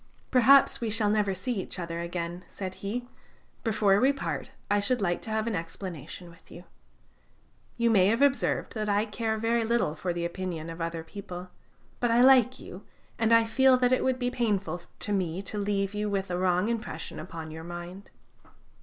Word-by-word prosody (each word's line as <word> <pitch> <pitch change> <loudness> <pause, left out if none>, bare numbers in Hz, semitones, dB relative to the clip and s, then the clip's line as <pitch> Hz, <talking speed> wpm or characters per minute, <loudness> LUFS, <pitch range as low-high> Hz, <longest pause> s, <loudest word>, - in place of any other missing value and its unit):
"Perhaps 265 +1 +6
we 230 - -1
shall 215 -1 +2
never 205 -2 +1
see 195 +3 -2
each - - -6
other 170 -1 -4
again," 170 +1 -4
said 190 -2 -6
he; 240 +5 -3 0.6
"before 210 -3 +3
we 265 +4 +4
part, 275 - -4 0.2
I 205 - +2
should 245 +5 +1
like 175 -4 0
to - - -7
have 220 0 0
an 230 -3 -1
explanation 170 0 -7
with 165 - -21
you. 175 - -11 1.1
You 235 -1 +3
may 190 -4 +5
have 230 +6 +3
observed 280 -1 +1
that 215 -3 -2
I 205 +1 +2
care 220 0 -2
very 230 +1 +1
little 225 -8 +1
for 175 +3 -3
the 170 0 -2
opinion 170 -2 -4
of 165 +1 -8
other 165 0 -3
people, 180 0 -8 0.5
but 240 - +1
I 235 +1 +4
like 255 -1 +6
you, 185 +3 -10 0.4
and 225 0 +2
I 230 0 +7
feel 260 +3 +4
that 250 0 +3
it 255 - +2
would 260 -1 +1
be 245 -1 -1
painful 200 -8 -1 0.2
to 205 - -3
me 180 -3 -1
to 205 +2 -4
leave 200 -1 -1
you 210 0 -2
with 195 -2 -2
a 175 - -1
wrong 180 +1 +2
impression 235 0 -4
upon 160 -3 -7
your 160 +1 -8
mind." 175 +3 -8
205 Hz, 195 wpm, -28 LUFS, 175-230 Hz, 1.1 s, I